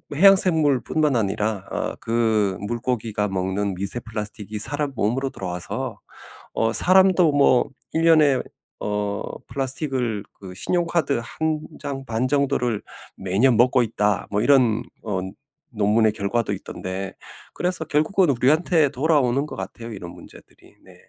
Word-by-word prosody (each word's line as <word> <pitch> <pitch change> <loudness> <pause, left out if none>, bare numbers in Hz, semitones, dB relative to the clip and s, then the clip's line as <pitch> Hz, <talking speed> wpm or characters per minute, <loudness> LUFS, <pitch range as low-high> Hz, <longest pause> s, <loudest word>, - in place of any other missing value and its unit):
해양생물뿐만 155 - +4
아니라 105 -1 -1
어 - - -3
그 110 -4 +1
물고기가 110 -1 -2
먹는 95 +1 -1
미세 100 +6 -3
플라스틱이 105 -1 -6
사람 145 +5 -2
몸으로 125 +6 0
돌아와서 90 -5 -5 0.5
어 115 0 +1
'사람도 185 - +4
뭐 140 -3 +4 0.3
1 165 - +2
년에 150 -5 +5 0.4
어 105 -1 -2 0.3
플라스틱을 130 -6 -2 0.2
그 95 -2 -9
신용카드 165 - 0
1 155 +4 -2 0.2
장 135 -1 -5
반 115 +2 -1
정도를 125 -6 0 0.3
매년 105 +6 +2
먹고 125 +2 +4
있다.' 105 -3 0
뭐 105 +1 0
이런 120 -5 +4 0.2
어 100 -4 -2 0.6
논문의 110 +1 +3
결과도 110 +2 -1
있던데 95 +1 -5 0.4
그래서 180 -2 -2
결국은 155 +4 +2
우리한테 150 +4 +3
돌아오는 140 -1 +2
것 - - -8
같아요, 115 0 -7
이런 90 -4 -7
문제들이. - - -16
네. - - -16
120 Hz, 285 characters per minute, -23 LUFS, 105-145 Hz, 0.6 s, 년에